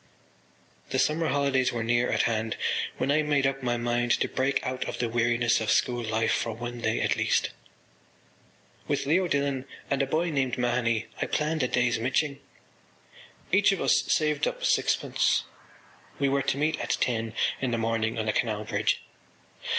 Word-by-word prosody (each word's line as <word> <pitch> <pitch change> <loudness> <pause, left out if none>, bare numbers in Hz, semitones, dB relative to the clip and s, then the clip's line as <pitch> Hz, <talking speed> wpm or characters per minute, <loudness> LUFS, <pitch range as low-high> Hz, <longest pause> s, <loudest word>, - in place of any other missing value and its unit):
The - - -1
summer 160 +2 +1
holidays 140 -3 +1
were 115 -2 -2
near 120 +2 +1
at - - +2
hand 110 -1 -1 0.4
when 135 - 0
I 155 +2 +3
made 145 -2 +1
up 135 0 0
my 120 -1 0
mind 120 0 0
to - - +1
break 135 +1 0
out 130 0 -2
of - - -5
the 120 - 0
weariness 120 0 +2
of 110 - -2
school 120 -1 +2
life 110 0 0
for 115 - -1
one 120 +1 -6
day 110 0 0
at - - +1
least. - - +1 1.4
With - - -1
Leo 175 +6 +2
Dillon 140 -3 -1 0.3
and 140 - +2
a 135 - 0
boy 165 +4 0
named 135 -4 0
Mahony 120 -2 0 0.2
I - - 0
planned 155 +1 0
a 125 - +2
day’s 120 -2 +1
miching. 140 +4 0 1.1
Each 200 +2 +5
of 195 - -1
us - - +3
saved 150 -2 +1
up - - -3
sixpence. - - +2 0.7
We 140 -1 +1
were 140 0 +1
to - - 0
meet 155 +2 0
at - - -1
ten 115 -2 -1 0.3
in 130 - 0
the 120 - 0
morning 115 0 -1
on 110 - -1
the 110 - 0
Canal 110 -3 -1
Bridge. - - 0
125 Hz, 180 wpm, -27 LUFS, 115-140 Hz, 1.4 s, Each